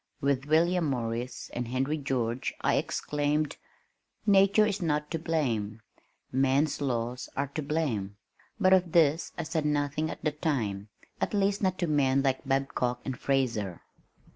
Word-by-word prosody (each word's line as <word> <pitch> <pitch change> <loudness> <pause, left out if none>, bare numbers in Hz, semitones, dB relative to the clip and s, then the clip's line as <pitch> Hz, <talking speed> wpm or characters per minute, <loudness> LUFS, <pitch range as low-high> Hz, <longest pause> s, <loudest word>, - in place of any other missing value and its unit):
With 140 -1 0
William 170 +3 +3
Morris 120 -2 -3
and 120 -1 -3
Henry 135 +5 -1
George 125 -3 -2
I - - +2
exclaimed, 150 +1 -1 0.7
"Nature 200 +1 +5
is 205 -1 -1
not 150 -3 -1
to 165 - -1
blame. 115 -10 -1 0.5
Man's 135 +3 +2
laws 125 -2 -2
are 140 0 0
to 155 - -4
blame," 135 -10 -2 0.4
but 185 0 +5
of 180 -3 +3
this 160 -1 +3
I - - -2
said 160 0 -1
nothing 150 +1 0
at - - -7
the 155 - +2
time 110 -10 -2 0.3
at - - 0
least 200 0 +1
not 185 -2 +1
to 175 - 0
men 140 -3 +2
like 135 -1 0
Babcock 135 -2 0
and 130 - -2
Fraser. 115 -9 -1
140 Hz, 150 wpm, -29 LUFS, 125-160 Hz, 0.7 s, Nature